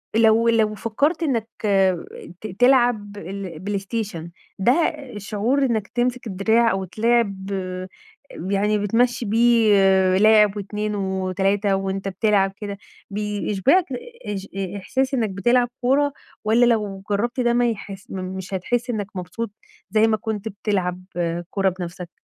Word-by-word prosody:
لو 225 +1 +5
لو 220 -2 +2
فكّرت 280 - 0
إنّك 235 -8 0 0.9
ت 215 - -5
تلعب 240 -5 +3
ال 190 -3 -6
بلايستيشن 195 -3 -4 0.3
ده 195 +6 +4 0.4
الشعور 215 +7 0
إنّك 220 -5 -1
تمسِك 245 0 -1
الدراع، 220 +4 +2
أو 190 0 -1
تلاعب 200 -1 0 1.0
يعني 205 +2 +2
بتمشّي 235 +4 +1
بيه 230 0 +4 0.4
لاعب 210 0 +5
و2 210 +1 -3
و3 195 +1 0
وأنت 195 0 -3
بتلعب 195 0 +2
كده، 205 -1 -6 0.3
بيشبعك 210 - +1 0.4
إش 200 -2 -4
أ 195 0 -3
إحساس 260 +8 -1
إنّك 230 -5 +1
بتلعب 240 +6 +2
كورة 280 +3 +2 0.3
والّا 225 +3 +4
لو 210 -5 0
جرّبت 235 +5 -1
ده 240 -1 +2
ما 240 0 +3
يحس 200 +1 -7
م - - -5
مش 185 +1 -6
هتحس 240 +7 -1
إنّك 210 -4 -2
مبسوط 190 +5 -5 0.4
زي 215 +2 +4
ما 220 -1 +2
كنت 215 0 -4
بتلعب 195 -4 -2
آآ 170 0 -1
كورة 195 -1 +1
بنفسك؟ 175 -1 -7
210 Hz, 130 wpm, -22 LUFS, 195-235 Hz, 1.0 s, لو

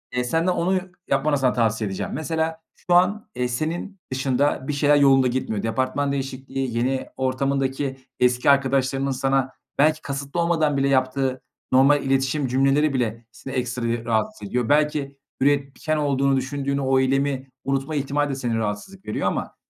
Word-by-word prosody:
eee, 125 - +1
senden 165 +8 +1
onu 180 +2 +1 0.3
yapmanı 145 +1 +2
sana 130 -2 +2
tavsiye 115 -2 +1
edeceğim. 95 - -4
Mesela, 160 +2 -2
şu 175 - -2
an, 185 +5 +3
eee, 125 - 0
senin 165 +10 -3
dışında 130 +1 0
bir 150 - -1
şeyler 145 +1 +3
yolunda 135 -2 +5
gitmiyor. 120 -4 -2
Departman 130 +5 0
değişikliği, 135 -2 -3
yeni 130 +2 0
ortamındaki 135 +1 -1 0.2
eski 125 +1 +3
arkadaşlarının 135 0 +2
sana 135 0 0 0.2
belki 155 +2 +3
kasıtlı 140 +3 -4
olmadan 160 -4 +2
bile 135 0 +2
yaptığı 130 0 +1 0.3
normal 140 +3 +5
iletişim 135 +1 +1
cümleleri 135 +3 +2
bile 115 -3 -2
seni 130 +3 -9
ekstra 125 -2 -2
yı 115 0 -2
rahatsız 110 -2 -1
ediyor. 120 +2 -1
Belki 150 -2 +1 0.2
üretken 140 +2 +1
olduğunu 140 -2 +2
düşündüğün 140 +1 -2
o 135 -1 +2
eylemi 135 0 0 0.2
unutma 135 +3 -1
ihtimali 145 +1 0
de 135 - -2
seni 120 -4 -2
rahatsızlık 110 - -4
veriyor 105 - -1
ama - - -3
135 Hz, 155 wpm, -23 LUFS, 130-145 Hz, 0.3 s, yolunda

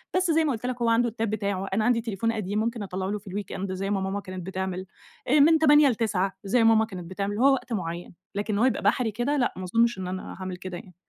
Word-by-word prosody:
بس 365 -2 +2
زي 320 0 +3
ما 290 - +1
قُلت 235 0 -4
لك 250 -1 -3
هو 230 - +2
عنده 235 +1 +3
التاب 225 -1 -2
بتاعه، 200 -3 -2
أنا 215 +2 +1
عندي 240 -2 +3
تليفون 225 0 -1
قديم 210 -1 -2
ممكن 230 0 -2
أطَلّعه 190 -1 -4
له 210 - -2
في 200 -1 -12
الweekend 195 -1 -4
زي 195 +1 -3
ما 195 -2 0
ماما 195 +1 -2
كانت 185 -3 -7
بتعمل. 190 0 -3 0.4
آآ 290 +4 +4
من 320 +2 +6
20:00 295 -2 +6
ل21:00 205 -5 0
زي 225 +4 +2
ما 225 - +6
ماما 220 0 +4
كانت 180 -5 -8
بتعمل، 200 +2 -3
هو 270 +3 +5
وقت 250 -2 -3
معيّن. 175 -3 -4 0.2
لكن 205 +1 -2
إن 200 - 0
هو 245 - +4
يبقى 260 - +1
بحري 220 +3 +2
كده 245 +7 -1
لأ، 245 - +1
ما 185 - -5
أظُنّش 230 +5 +2
إن 185 -1 -4
أنا 185 0 -5
هاعمل 185 -1 -6
كده 185 -1 -6
يعني. 180 0 -13
210 Hz, 265 wpm, -26 LUFS, 190-235 Hz, 0.4 s, من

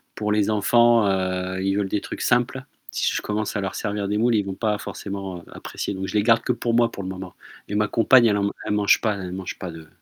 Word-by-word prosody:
Pour 105 0 -2
les 105 0 +2
enfants, 115 +1 +4
heu, 95 0 -1
ils 95 0 0
veulent 100 -1 -1
des 105 - -1
trucs - - -7
simples. 125 +2 +1 0.3
Si - - 0
je - - -1
commence 105 0 -3
à 105 - 0
leur 95 -1 -4
servir 100 -2 -2
des 105 - 0
moules, 115 +1 +3
ils 105 - +2
vont 95 - -4
pas 105 +1 -1
forcément 95 -4 -6
apprécier. - - -5
Donc 95 0 -4
je - - -6
les 105 - +3
garde 115 0 +4
que - - 0
pour 120 -1 -1
moi 120 0 +3
pour 100 - -7
le 95 - -5
moment. 95 -1 -7 0.3
Mais 105 - -3
ma 105 0 +2
compagne, 120 +2 +5
elle 105 -3 +3
en 100 0 0
elle - - -1
mange 105 -1 +4
pas 110 -3 +1
elle 90 -2 -6
mange 95 0 -6
pas 90 -2 -5
de 80 -1 -11
105 Hz, 265 wpm, -23 LUFS, 95-110 Hz, 0.3 s, compagne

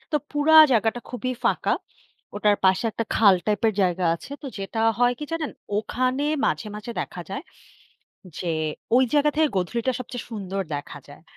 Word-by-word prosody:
তো - - +4
পুরা 295 +2 +3 0.2
জাগাটা 225 +1 +1
খুবই 255 +1 -3
ফাঁকা। - - +1 0.6
ওটার 205 0 +3
পাশে 190 +4 +4
একটা 230 - -2
খাল 200 -4 +6
টাইপের 215 +1 +2
জায়গা 180 0 +1
আছে। 170 - -11
তো - - -6
যেটা 195 +3 -5 0.2
হয় 245 0 +4
কি 300 - -4
জানেন? 325 -3 -2 0.3
ওখানে 255 +5 -1 0.2
মাঝে, - - -1
মাঝে 215 +3 -7
দেখা 180 - -6
যায়, 270 +9 -4 1.0
যে 180 - -4 0.5
ঐ - - +7 0.2
জায়গা 295 0 +4
থেকে 315 0 +4
গধূলিটা 235 +8 -1
সবচেয়ে 245 -1 -6
সুন্দর 195 -3 -4
দেখা 145 - -7
যায়। - - -14
230 Hz, 165 wpm, -24 LUFS, 195-260 Hz, 1.0 s, ঐ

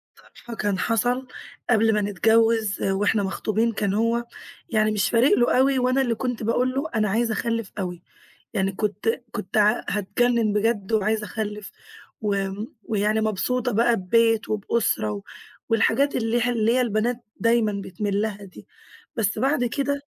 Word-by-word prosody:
ف - - -21 0.2
فكان 205 -5 -2
حصل 245 +3 0 0.4
قبل 225 -1 +4
ما 210 - +1
نتجوز، 220 +2 +2
وإحنا 200 +2 +1
مخطوبين 215 +4 0
كان 205 -2 -1
هو 230 +2 +1 0.4
يعني 215 -1 +2
مش 205 -2 +1
فارق 240 +4 +4
له 240 +1 +3
أوي، 265 0 +3
وأنا 255 +2 +2
اللي 235 -3 0
كنت 245 -1 -3
باقول 245 +3 +1
له: 270 +2 -1
"أنا 215 -2 +1
عايزة 225 +2 +1
أخلّف 230 -3 -2
أوي"، 180 -2 -4 0.5
يعني 195 0 0
كنت 210 +1 -2 0.2
كنت 185 - -5
ع 210 0 +4
هاتجنّن 215 +2 +1
بجد 210 0 0
وعايزة 215 0 +1
أخلّف 210 -1 -5 0.5
و 200 -2 0 0.4
ويعني 215 0 0
مبسوطة 235 +4 0
بقى 230 +2 +3
ببيت 225 +4 +2
وبأسرة 210 - 0
و 100 - -6 0.5
والحاجات 235 +5 +2
اللي 235 0 0
ه 245 - +1
اللي 230 -1 +1
هي 255 - +3
البنات 235 0 0 0.2
دايمًا 225 -3 +2
بتميل 200 +2 -2
لها 205 -2 -4
دي. 185 - -14 0.5
بس 215 -2 0
بعد 265 +1 +1
كده 280 +3 -1
220 Hz, 155 wpm, -24 LUFS, 205-235 Hz, 0.5 s, قبل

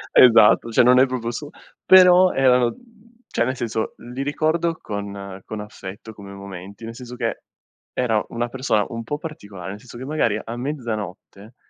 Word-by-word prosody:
Esatto, 115 -2 +7
cioè - - +5
non 125 +1 +6
è 130 - +5
proprio 125 -2 -3
il - - -4
su 145 +4 -6 0.3
però 185 0 +7
erano, 125 -2 +3 0.5
cioè - - 0
nel 130 +2 -2
senso, 115 -2 -3 0.2
li 135 - -4
ricordo 160 +3 0
con 100 -1 -6
con 110 - -7
affetto 105 +1 -9
come 100 -2 -11
momenti, 100 +2 -9
nel 115 - -7
senso 125 0 -9
che - - -3 0.5
era 115 -4 +1
una 120 +1 -3
persona 120 -5 0
un 115 0 -5
po' 145 +6 -3
particolare, 100 - -8
nel 100 - -8
senso 120 +1 -12
che 130 - -7
magari 130 -8 0
a 115 - -6
mezzanotte 115 - -6
115 Hz, 175 wpm, -22 LUFS, 105-130 Hz, 0.5 s, Esatto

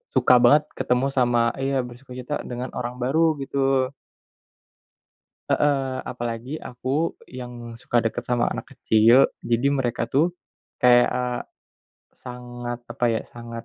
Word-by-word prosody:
suka 125 -1 +6
banget 145 +5 +6 0.2
ketemu 125 +2 +1
sama 120 -3 +2
iya 135 -1 0
bersukacita 125 +3 -6
dengan 125 +1 -5
orang 120 0 -4
baru 160 +4 +2
gitu. 135 -1 +1 1.6
Heeh, 135 -3 +1
apalagi 120 +4 -5
aku 135 +6 -2
yang 120 -2 -8
suka 120 +1 -2
deket 120 +2 -2
sama 120 -1 +1
anak - - -7
kecil, 115 +4 +5 0.2
jadi 120 +3 +1
mereka 120 -3 -1
tuh 165 +9 +1 0.4
kayak 120 -1 +5 1.0
sangat 120 -1 -7
apa 125 - -2
ya 115 -1 +1
sangat 115 -1 -9
125 Hz, 120 wpm, -24 LUFS, 120-135 Hz, 1.6 s, suka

